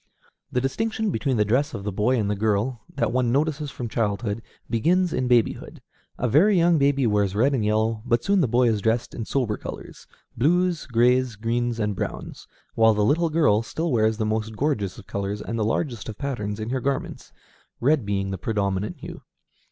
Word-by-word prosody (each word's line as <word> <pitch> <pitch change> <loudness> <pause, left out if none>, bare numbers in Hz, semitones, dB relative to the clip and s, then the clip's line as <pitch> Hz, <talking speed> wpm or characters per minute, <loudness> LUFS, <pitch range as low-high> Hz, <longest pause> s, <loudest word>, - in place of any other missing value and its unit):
The 125 - +1
distinction 220 - -1
between 135 -7 0
the 105 - +3
dress 140 +7 +1
of 100 - -6
the 105 - -2
boy 110 +6 +1
and 105 -3 0
the 105 - 0
girl, 110 +4 0
that - - 0
one 125 -1 +1
notices 150 +2 0
from 125 -2 -5
childhood, 105 0 -2 0.3
begins 170 +10 +1
in 130 - 0
babyhood. 120 -2 +1 0.4
A 125 - 0
very 180 - +4
young 170 -1 +4
baby 140 -1 +2
wears 105 -3 +1
red 130 +7 +3
and 125 -5 0
yellow, 110 +1 +1
but 120 -1 +1
soon 200 -1 +3
the 145 - +2
boy 120 +2 +3
is 110 -3 +1
dressed 115 +2 0
in 115 - -5
sober 120 -6 -1
colors, - - -9 0.3
blues, 175 +5 +1
grays, 125 0 +2
greens, 115 +2 -1
and 105 -2 -1
browns; - - -6 0.3
while 110 -1 +4
the 105 0 +2
little 165 +7 +2
girl 150 -10 +3
still 160 +8 -3
wears 110 -2 +2
the 110 - -1
most 110 0 -2
gorgeous 130 -11 -1
of 110 - -12
colors 100 +1 -3
and 115 +2 -4
the - - +1
largest 115 0 -2
of 105 - -7
patterns 105 -7 -3
in 110 +2 -4
her 130 -1 -1
garments, 140 +1 -3 0.5
red 140 +1 +2
being 100 -1 -2
the 95 - -4
predominant 100 0 -2
hue. - - -9
115 Hz, 200 wpm, -24 LUFS, 105-140 Hz, 0.5 s, very